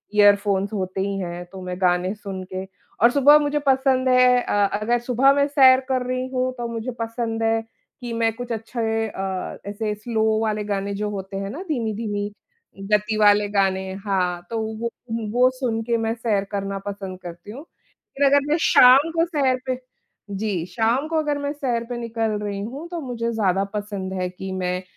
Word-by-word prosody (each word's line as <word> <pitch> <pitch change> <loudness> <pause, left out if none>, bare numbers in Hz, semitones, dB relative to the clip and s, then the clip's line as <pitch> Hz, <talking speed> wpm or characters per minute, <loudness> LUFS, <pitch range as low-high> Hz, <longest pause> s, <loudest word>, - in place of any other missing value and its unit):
Earphones 200 -1 +4
होते 190 -1 -2
ही 200 0 -2
हैं 175 -1 -5
तो 190 -1 -9
मैं 180 0 -5
गाने 180 +1 +2
सुन 195 -3 -6
के 185 - -3 0.4
और 235 - +7
सुबह 285 +2 +7
मुझे 295 0 0
पसंद 265 -1 +3
है 250 0 +5
अ, - - -4 0.3
अगर 240 +3 +1
सुबह 250 +3 +3
मैं 280 0 +2
सैर 265 -3 +6
कर 255 -1 0
रही 255 0 -2
हूँ 255 0 0
तो 240 -1 -3
मुझे 230 +2 -4
पसंद 230 0 -2
है 225 0 +2 0.4
कि 240 -1 -5
मैं 230 0 +1
कुछ 245 0 -6
अच्छे 225 0 -2
अ, 190 -2 -4
ऐसे 210 +1 -2
स्लो 220 +1 -2 0.2
वाले 215 -1 -1
गाने 200 -1 -2
जो 210 +1 -2
होते 195 -1 -5
हैं 195 0 -4
ना, 290 - -6
धीमी-धीमी 215 -6 -2 0.6
गति 210 +1 +2
वाले 205 -1 +5
गाने, 190 -1 0
हाँ, 190 -3 -1
तो 230 - -3 0.2
वो 235 +1 -1 0.4
वो 250 +2 +4
सुन 225 -4 -1
के 235 0 0
मैं 225 0 -1
सैर 225 -4 0
करना 200 -1 -3
पसंद 195 -2 -6
करती 175 +3 -9
हूँ। 265 +7 -9 0.5
फिर 280 +1 +2
अगर 280 +1 +6
मैं 300 +2 +2
शाम 270 +4 +7
को 330 0 +3
सैर 275 -6 +1
पे 255 -1 -2 0.5
जी, 200 -4 -2
शाम 225 - 0
को 325 0 -1
अगर 295 -2 0
मैं 285 0 -2
सैर 250 -5 -1
पे 245 - -3
निकल 230 -2 -2
रही 200 -1 -3
हूँ 275 +10 -7
तो 345 -1 -4
मुझे 235 -3 -3
ज़्यादा 195 -4 +1
पसंद 205 -2 -4
है 180 - -1
कि 190 +1 -7
मैं 180 -1 -2
225 Hz, 190 wpm, -23 LUFS, 195-255 Hz, 0.6 s, और